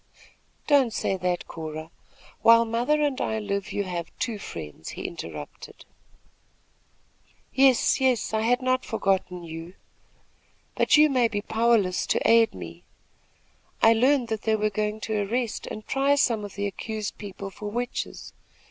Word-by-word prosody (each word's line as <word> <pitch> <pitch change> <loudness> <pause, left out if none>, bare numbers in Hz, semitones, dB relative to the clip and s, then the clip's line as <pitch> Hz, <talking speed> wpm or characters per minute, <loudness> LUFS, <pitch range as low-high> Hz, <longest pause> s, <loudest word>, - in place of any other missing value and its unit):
"Don't 275 -5 +4
say 195 - -1
that, 180 -1 -2
Cora. 155 0 -7 0.5
While 230 0 +7
mother 245 +7 +1
and 280 -2 0
I 220 - -1
live, 200 -2 -3
you 205 - -1
have 175 -3 -4
two 230 -4 -3
friends," 80 - -8
he - - -7
interrupted. 75 -3 -8 1.7
"Yes 265 -1 +4
yes; 255 -4 +1
I 220 - +1
had 245 +3 +1
not 255 0 +1
forgotten 190 -5 -1
you; 165 +2 -8 1.0
but - - +4
you 305 +1 +7
may 255 -5 +3
be 205 -2 -3
powerless 220 -5 +2
to - - +1
aid 230 0 +5
me. 85 -1 -9 1.0
I 225 - +8
learned 250 +1 +2
that 220 -1 -2
they 220 -1 +1
were 215 0 0
going 210 +1 -2
to 215 -2 -1
arrest 230 +3 -2
and 215 - -7
try 275 +1 +2
some 235 -7 +1
of 205 - -8
the 200 +1 -2
accused 215 +1 -5
people 195 -1 -7
for 205 +2 -7
witches. 245 +3 -4
220 Hz, 150 wpm, -26 LUFS, 190-245 Hz, 1.7 s, I